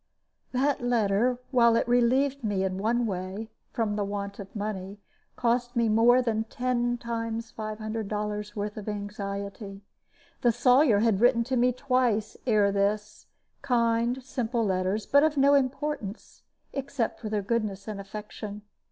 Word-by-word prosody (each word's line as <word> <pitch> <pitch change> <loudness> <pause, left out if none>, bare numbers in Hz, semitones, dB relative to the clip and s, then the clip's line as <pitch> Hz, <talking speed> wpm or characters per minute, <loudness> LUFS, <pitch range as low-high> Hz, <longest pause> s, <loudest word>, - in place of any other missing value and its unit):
That 270 +2 +1
letter, 240 0 +2
while 235 -3 +5
it 230 - +1
relieved 255 +3 +2
me 205 -3 0
in 190 0 -2
one 235 +4 +1
way, 195 +2 -4 0.2
from 215 -3 -1
the 205 - 0
want 200 0 -4
of 195 +1 -9
money, 200 -1 -4 0.4
cost 245 +1 0
me 235 -1 +2
more 240 +3 +5
than 220 -2 0
ten 240 +1 -1
times 230 -1 -4
five 215 -1 -5
hundred 215 -1 -4
dollars' 210 0 -3
worth 205 0 -4
of 215 0 -5
anxiety. 200 -1 -5 0.6
The 240 - +4
Sawyer 245 -1 +4
had 220 -3 +2
written 240 -1 +5
to 260 +2 -2
me 250 +1 +3
twice 250 -4 0
ere 210 -3 +4
this 205 +2 -1 0.3
kind, 240 -1 +1
simple 240 -3 -1
letters, 190 +2 0
but 285 - +5
of 305 -1 +2
no 280 +1 +5
importance, 270 -5 -2 0.3
except 275 -3 -2
for 220 - -5
their 210 -1 -1
goodness 210 -2 -2
and 210 -2 -4
affection. 210 +1 -8
225 Hz, 150 wpm, -27 LUFS, 205-245 Hz, 0.6 s, while